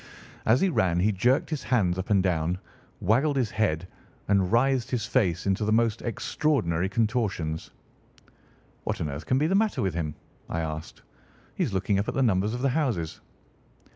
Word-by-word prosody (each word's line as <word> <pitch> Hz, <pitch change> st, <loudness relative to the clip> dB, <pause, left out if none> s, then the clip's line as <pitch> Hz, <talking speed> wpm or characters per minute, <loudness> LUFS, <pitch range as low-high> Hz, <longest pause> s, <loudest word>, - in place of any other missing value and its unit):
As 115 Hz, +3 st, +5 dB
he 195 Hz, -, +3 dB
ran 90 Hz, -, +1 dB
he 105 Hz, +3 st, +3 dB
jerked 120 Hz, -, +1 dB
his 155 Hz, -, -2 dB
hands 95 Hz, -8 st, +1 dB
up 95 Hz, -, -4 dB
and 100 Hz, -3 st, +4 dB
down, 90 Hz, -1 st, 0 dB, 0.4 s
waggled 130 Hz, +9 st, +2 dB
his 125 Hz, -5 st, 0 dB
head, 90 Hz, -6 st, 0 dB, 0.4 s
and 100 Hz, -2 st, +3 dB
writhed 125 Hz, +1 st, +2 dB
his 120 Hz, -3 st, -1 dB
face 95 Hz, -9 st, +1 dB
into 100 Hz, +2 st, +1 dB
the 105 Hz, -, 0 dB
most 115 Hz, 0 st, +2 dB
extraordinary 100 Hz, -, 0 dB
contortions. 105 Hz, -8 st, -1 dB, 1.1 s
"What -, -, -2 dB
on 75 Hz, -, -2 dB
earth 70 Hz, +2 st, -6 dB
can 130 Hz, -, +2 dB
be 145 Hz, -, +2 dB
the 170 Hz, -, +1 dB
matter 215 Hz, -, +2 dB
with 95 Hz, -, 0 dB
him?" 80 Hz, -3 st, -3 dB, 0.3 s
I 85 Hz, -, -1 dB
asked. 80 Hz, -1 st, -6 dB, 0.5 s
"He -, -, -1 dB
is -, -, -1 dB
looking 100 Hz, +1 st, +1 dB
up 100 Hz, -, -2 dB
at -, -, -3 dB
the 135 Hz, -, +2 dB
numbers 105 Hz, 0 st, +1 dB
of 125 Hz, -, -4 dB
the 135 Hz, -, +3 dB
houses." 120 Hz, -, -1 dB
105 Hz, 185 wpm, -27 LUFS, 90-125 Hz, 1.1 s, As